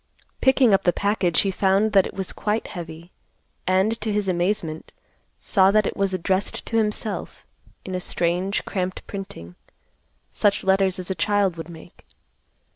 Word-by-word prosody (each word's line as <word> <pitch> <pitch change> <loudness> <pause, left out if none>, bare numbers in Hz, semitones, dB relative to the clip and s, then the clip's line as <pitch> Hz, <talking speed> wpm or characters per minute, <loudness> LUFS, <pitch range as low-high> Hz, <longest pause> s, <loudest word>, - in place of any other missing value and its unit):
Picking 265 -4 +5
up 195 - +4
the 175 - +4
package 200 -4 +1
he 195 - 0
found 195 +3 +2
that 195 -2 +4
it - - -11
was 190 -2 -3
quite 210 +1 -1
heavy, 170 -1 -8 0.6
and, 190 +5 +2
to 215 0 -1
his 205 -1 0
amazement, 175 -3 -1 0.5
saw 190 -1 +4
that 210 +1 +3
it - - -2
was 195 -1 0
addressed 185 +2 -1
to - - -4
himself, 215 0 -2 0.4
in 185 - -5
a 185 - -1
strange, 180 +3 -1
cramped 185 -1 -3
printing, 190 - -8 0.8
such 205 -1 +1
letters 190 -1 +2
as 185 0 -5
a - - +2
child 195 0 +1
would 165 +1 -8
make. 170 +1 -13
190 Hz, 160 wpm, -23 LUFS, 180-205 Hz, 0.8 s, Picking